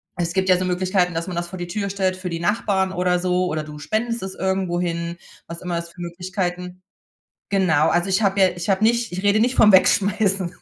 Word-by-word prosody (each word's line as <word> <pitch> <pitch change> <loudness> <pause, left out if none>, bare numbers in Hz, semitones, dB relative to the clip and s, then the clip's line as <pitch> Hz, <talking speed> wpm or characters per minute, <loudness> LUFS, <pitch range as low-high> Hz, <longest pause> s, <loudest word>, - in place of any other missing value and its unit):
es 170 -1 -2
gibt 190 0 0
ja 180 - +6
so 185 - -2
Möglichkeiten, 180 0 0
dass 165 +3 -3
man 180 - -5
das 175 0 -3
vor 185 -1 -8
die 175 - -4
Tür 200 +2 -3
stellt 190 -1 0
für 185 -2 -5
die 165 - -3
Nachbarn 190 0 0
oder 180 -1 +1
so 180 0 +1
oder 155 -3 -2
du 150 0 -10
spendest 225 +7 -2
es 190 - -5
irgendwo 190 -2 -1
hin, 170 -1 -3 0.3
was 170 0 -8
immer 175 -2 -3
es 170 0 -5
für 175 +1 -12
Möglichkeiten 180 +1 -4 0.7
genau, 165 -6 +2
also, 175 +3 +1
ich 190 +3 +1
habe 195 0 +1
ja 190 - +6
ich 175 +1 -6
habe 195 +1 +1
nicht 235 +1 +2
ich 180 +1 -4
rede 205 +1 +3
nicht 245 +3 +2
vom 210 -4 +6
Wegschmeißen. 195 -1 +2
185 Hz, 230 wpm, -22 LUFS, 175-195 Hz, 0.7 s, ja